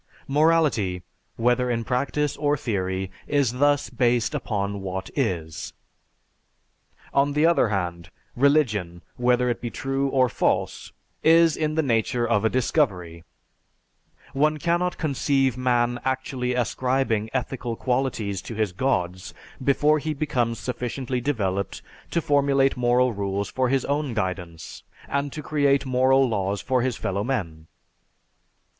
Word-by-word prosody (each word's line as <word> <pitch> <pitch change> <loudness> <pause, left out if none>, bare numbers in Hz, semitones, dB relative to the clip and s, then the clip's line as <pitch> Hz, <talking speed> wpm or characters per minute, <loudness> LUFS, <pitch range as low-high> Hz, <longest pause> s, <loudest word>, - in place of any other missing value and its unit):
Morality, 140 - +2 0.3
whether 125 +2 +1
in 115 -1 -1
practice 140 +4 -1
or 145 0 +1
theory, 95 -6 -2 0.2
is 130 -4 +1
thus 145 -1 +2
based 120 0 +1
upon 100 -7 -2
what 95 0 -5
is. 85 - -2 1.4
On 140 +1 +2
the 150 +2 +3
other 170 -7 +4
hand, 85 -4 -3 0.3
religion, 110 - +1
whether 125 0 +2
it 120 - -1
be 120 - -3
true 135 +3 -2
or 130 -1 +3
false, - - -1 0.3
is 165 0 +5
in 155 -1 -1
the 160 - +2
nature 120 -1 +1
of 110 -3 +2
a 110 - +3
discovery 95 - 0 1.1
one 150 +2 +2
cannot 175 +3 0
conceive 135 -4 +1
man 120 -1 +1
actually 130 -1 -2
ascribing 125 -2 0
ethical 125 -2 -3
qualities 125 -6 -1
to 115 - -8
his 105 -3 0
Gods 90 -4 -2 0.3
before 150 +3 +3
he 155 +1 -3
becomes 125 -6 -1
sufficiently 125 +1 -3
developed 100 -8 -2 0.3
to 170 - -1
formulate 140 -1 +3
moral 125 0 +2
rules 100 0 -2
for 130 -1 0
his 135 0 +1
own 140 -4 -1
guidance, 90 -5 -4 0.3
and 140 0 -1
to 150 - -7
create 140 -2 +2
moral 130 +1 +3
laws 100 -3 -1
for 130 -1 0
his 125 -1 -1
fellowmen. 95 -7 -3
125 Hz, 130 wpm, -24 LUFS, 105-140 Hz, 1.4 s, is